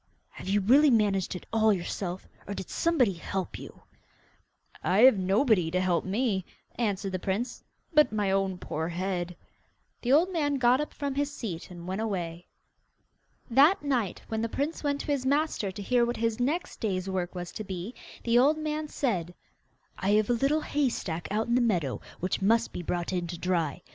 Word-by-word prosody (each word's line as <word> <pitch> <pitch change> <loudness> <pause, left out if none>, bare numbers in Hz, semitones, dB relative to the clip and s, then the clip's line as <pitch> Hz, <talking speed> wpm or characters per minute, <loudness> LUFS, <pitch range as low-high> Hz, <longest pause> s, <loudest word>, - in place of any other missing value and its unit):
'Have - - -8
you 205 +1 +3
really 275 +9 +6
managed 205 -6 +2
it 180 - -7
all 220 -1 +4
yourself, 180 -1 -3 0.2
or 200 - -4
did 190 - -7
somebody 280 - +2
help 185 +2 -4
you?' - - -12 1.0
'I 185 - +2
have 255 -3 +8
nobody 195 - +3
to 180 +2 0
help 185 -2 +1
me,' 200 -1 0 0.3
answered 200 -4 -1
the 185 - -2
prince, 200 +7 -3 0.3
'but 300 -1 +5
my 205 -3 0
own 195 -1 0
poor 160 -2 -3
head.' 180 0 -3 0.7
The 245 - 0
old 340 +7 +4
man 290 -4 +1
got 255 +1 +4
up 300 - -4
from 285 -1 -3
his 285 +1 -1
seat 195 - -6
and 175 -1 -9
went 190 +3 -2
away. 175 -5 -3 1.0
That 290 +10 +5
night, 250 -9 -1
when 220 0 -2
the 230 - -1
prince 290 +8 -2
went 285 -1 0
to - - -8
his 280 -3 0
master 280 -7 +1
to 195 - -8
hear 245 +3 +3
what 240 +1 -1
his 230 0 0
next 295 +8 -1
day's 190 -4 -1
work 185 -2 -2
was 175 -1 -5
to 215 - -6
be, 190 +3 -5 0.3
the 235 0 +4
old 290 +5 +4
man 310 0 -2
said: 180 - -2 0.6
'I 190 - 0
have 215 +1 +3
a - - +4
little 275 +6 +2
hay 290 -3 +1
stack 170 -7 -4
out 215 +2 0
in 235 - -1
the 250 - +4
meadow 175 - 0 0.2
which 185 +2 -1
must 225 +4 +2
be - - -4
brought 175 +1 -2
in 175 -1 -1
to 175 0 -5
dry. 170 -5 -1
210 Hz, 195 wpm, -28 LUFS, 185-260 Hz, 1.0 s, have